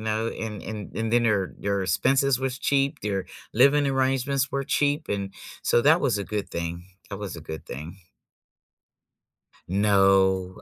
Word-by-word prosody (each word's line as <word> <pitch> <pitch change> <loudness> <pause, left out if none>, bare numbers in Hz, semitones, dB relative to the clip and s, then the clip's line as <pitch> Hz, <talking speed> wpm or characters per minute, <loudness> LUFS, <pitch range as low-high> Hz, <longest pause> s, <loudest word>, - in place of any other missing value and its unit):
know, 110 +1 -1
and 110 -3 -5
and 105 -2 -7
and 115 0 -2
then 120 0 +4
their 105 -5 +1
their 100 -1 -1
expenses 130 +9 +2
was 130 -1 -2
cheap, 140 +1 +1
their 100 -2 -2 0.3
living 140 +5 +4
arrangements 135 0 +1
were 140 0 -2
cheap, 145 +3 0
and 100 -1 -3 0.3
so - - +3
that 160 +6 +5
was 125 -7 +1
a 100 - -3
good 105 +1 -4
thing. 85 +1 -4 0.2
That 100 - -6
was 100 -5 -5
a - - -8
good 80 0 -8
thing. 80 +8 -8 1.7
No. 95 -1 +3
110 Hz, 160 wpm, -25 LUFS, 95-135 Hz, 1.7 s, that